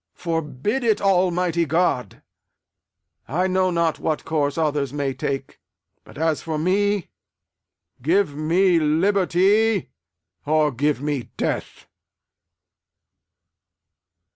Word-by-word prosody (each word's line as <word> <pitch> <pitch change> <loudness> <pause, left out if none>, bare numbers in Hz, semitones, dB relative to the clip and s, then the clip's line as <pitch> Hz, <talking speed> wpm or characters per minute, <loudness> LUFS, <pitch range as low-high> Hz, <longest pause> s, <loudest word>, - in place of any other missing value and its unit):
Forbid 165 - -2
it, 220 -3 +2
Almighty 180 -3 +2
God! 155 - -1 1.0
I 175 +7 0
know 185 0 +1
not 170 -2 0
what 155 -2 -2
course 145 -2 -1
others 150 -4 0
may 140 -2 -2
take; 135 +1 -4 0.4
but - - -15
as 160 -1 0
for 160 -2 -3
me, 200 +4 0 0.9
give 170 +3 +2
me 170 +4 +2
liberty 190 +5 +2 0.5
or 155 0 +2
give 140 +1 0
me 145 -4 -3
death! - - -3
165 Hz, 95 wpm, -22 LUFS, 150-185 Hz, 1.0 s, it